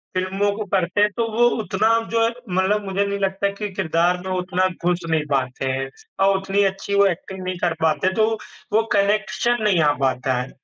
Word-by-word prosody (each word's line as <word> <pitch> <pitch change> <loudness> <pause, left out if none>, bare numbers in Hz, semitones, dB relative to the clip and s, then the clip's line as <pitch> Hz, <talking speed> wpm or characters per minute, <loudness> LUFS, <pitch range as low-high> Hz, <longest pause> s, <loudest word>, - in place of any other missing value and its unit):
फ़िल्मों 190 +2 0
को 215 - -3
पढ़ते 185 0 0
हैं, 210 - +5
तो 230 -1 +1
वो 235 +2 +2 0.2
उतना 210 +2 +1 0.2
जो 230 0 +3 0.3
मतलब 200 +3 +1
मुझे 195 +1 0
नहीं 200 0 -2
लगता 195 0 0
कि 210 +1 -5
किरदार 175 -1 +1
में 190 - -3
उतना 185 0 0 0.2
घुस 180 0 +2
नहीं 160 -2 +1
पाते 130 -1 -1
हैं 135 0 -3 0.4
और 195 0 +4
उतनी 195 +1 +1
अच्छी 195 +1 -2
वो 200 0 +5
एक्टिंग 190 +1 -4
नहीं 185 0 -3
कर 175 -2 +1
पाते, 160 +4 +2
तो 220 +2 +2 0.4
वो 220 +1 +4
कनेक्शन 215 +3 +1
नहीं 200 -5 +3
आ 150 - +4
पाता 130 0 +1
है। 125 - -7
190 Hz, 200 wpm, -22 LUFS, 175-205 Hz, 0.4 s, हैं